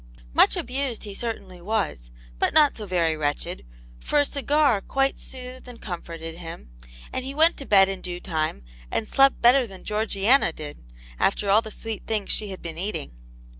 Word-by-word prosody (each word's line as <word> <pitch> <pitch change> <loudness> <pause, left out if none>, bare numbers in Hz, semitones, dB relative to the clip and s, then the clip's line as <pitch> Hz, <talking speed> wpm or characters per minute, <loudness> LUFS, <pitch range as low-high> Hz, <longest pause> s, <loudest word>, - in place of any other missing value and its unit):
Much - - +5
abused 255 -1 -2
he 205 - -6
certainly 195 -5 -5
was, 190 - -2 0.3
but - - +1
not 300 -3 +6
so 210 -2 -6
very 170 -3 +1
wretched, 145 - -2 0.4
for 295 - +1
a 290 - +4
cigar 285 -5 +2
quite 270 +4 0
soothed 255 0 -8
and 245 -2 -10
comforted 165 -2 -7
him, 165 - -9 0.4
and 260 - -2
he 270 +2 -6
went 325 +3 +5
to 275 - -8
bed 195 -2 +6
in 195 -1 -4
due 175 -1 -5
time, 155 - -2 0.3
and 220 - -2
slept 275 0 +4
better 245 +1 +6
than 190 -3 -12
Georgiana 215 +1 +2
did, 150 -2 -8 0.4
after 200 0 +2
all 215 +3 +6
the 220 - -8
sweet 220 0 -6
things 215 -3 -1
she 210 - +1
had 190 - -8
been 165 -1 -5
eating. 195 - -3
210 Hz, 180 wpm, -25 LUFS, 175-255 Hz, 0.4 s, not